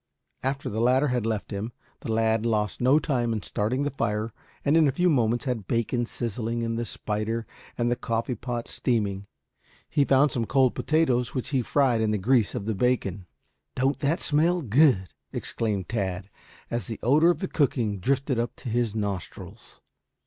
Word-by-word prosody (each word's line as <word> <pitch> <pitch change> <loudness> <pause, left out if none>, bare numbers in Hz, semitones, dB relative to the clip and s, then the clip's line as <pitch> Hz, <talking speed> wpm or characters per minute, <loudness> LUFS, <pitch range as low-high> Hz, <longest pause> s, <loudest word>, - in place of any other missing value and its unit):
After 135 +1 -2
the 110 +2 -2
latter 130 +4 +3
had 125 -3 0
left 110 -1 -2
him, 105 +4 -4 0.3
the - - -4
lad 110 0 +2
lost 105 -3 0
no 130 +4 +5
time 125 -7 0
in 110 - -3
starting 125 +7 -1
the 145 - -1
fire 110 -3 -2 0.3
and 145 +2 +4
in 160 -2 +5
a - - +3
few 175 +6 +2
moments 120 -2 +1
had 115 -7 -2
bacon 120 +1 0
sizzling 115 0 -3
in 115 0 -1
the 120 +1 -2
spider 110 +2 -3 0.3
and 120 0 +1
the - - +2
coffee 115 +1 -2
pot 120 0 -4
steaming. 100 -5 -1 0.6
He 145 - +2
found 140 +1 +4
some 115 -2 -1
cold 130 +1 +3
potatoes 130 -6 +1
which 130 - -2
he 135 -3 +1
fried 125 -2 +2
in 110 - +1
the 105 - +1
grease 115 +2 +2
of 110 -5 -3
the 110 - 0
bacon. 100 -5 0 0.5
"Don't 135 +1 +1
that 150 +4 +1
smell 165 +4 +2
good!" 125 - +4 0.2
exclaimed 105 -5 -2
Tad, 95 -3 -3 0.4
as 120 0 -2
the 115 - -5
odor 150 +7 +5
of 175 - +2
the 190 - -3
cooking 120 - 0
drifted 135 +3 0
up 120 0 -2
to 125 - -7
his 115 -2 0
nostrils. 100 -4 -6
120 Hz, 185 wpm, -26 LUFS, 110-135 Hz, 0.6 s, no